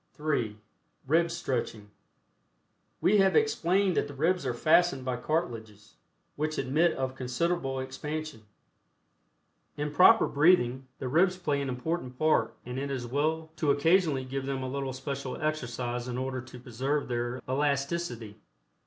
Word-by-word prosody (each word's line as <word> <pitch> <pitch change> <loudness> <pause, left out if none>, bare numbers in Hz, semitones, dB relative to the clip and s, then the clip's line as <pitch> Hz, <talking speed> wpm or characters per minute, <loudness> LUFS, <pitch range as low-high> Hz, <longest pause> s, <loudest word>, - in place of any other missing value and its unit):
(3) 130 -9 -1 0.5
RIB 165 +5 +3
STRETCHING. 115 -9 -3 1.1
We 210 +2 +4
have 195 0 +4
explained 195 - +2
that - - +1
the 145 - -10
ribs 165 +1 +1
are 125 - 0
fastened 155 0 +3
by 130 -1 -1
cartilages, 115 -8 -3 0.4
which 155 +1 -2
admit 160 +6 +2
of 130 -1 -3
considerable 135 +2 -1
expansion. 150 +1 -5 1.4
In 150 0 -3
proper 205 +8 +7
breathing, 135 -5 +3
the 130 - -4
ribs 180 +7 +3
play 145 -6 -1
an 140 - -3
important 130 0 -3
part, 155 +2 +2
and 125 +2 -4
it 140 +1 -3
is 130 -3 -3
well 155 +5 -1
to 150 - 0
occasionally 150 -2 +3
give 135 +1 -4
them 135 -1 -2
a - - -3
little 135 -1 -3
special 135 0 -5
exercise 125 -5 -2
in 125 0 -3
order 130 0 -3
to 125 0 -12
preserve 130 +4 -2
their 120 +1 -2
elasticity. 140 -5 -1
140 Hz, 145 wpm, -29 LUFS, 125-160 Hz, 1.4 s, proper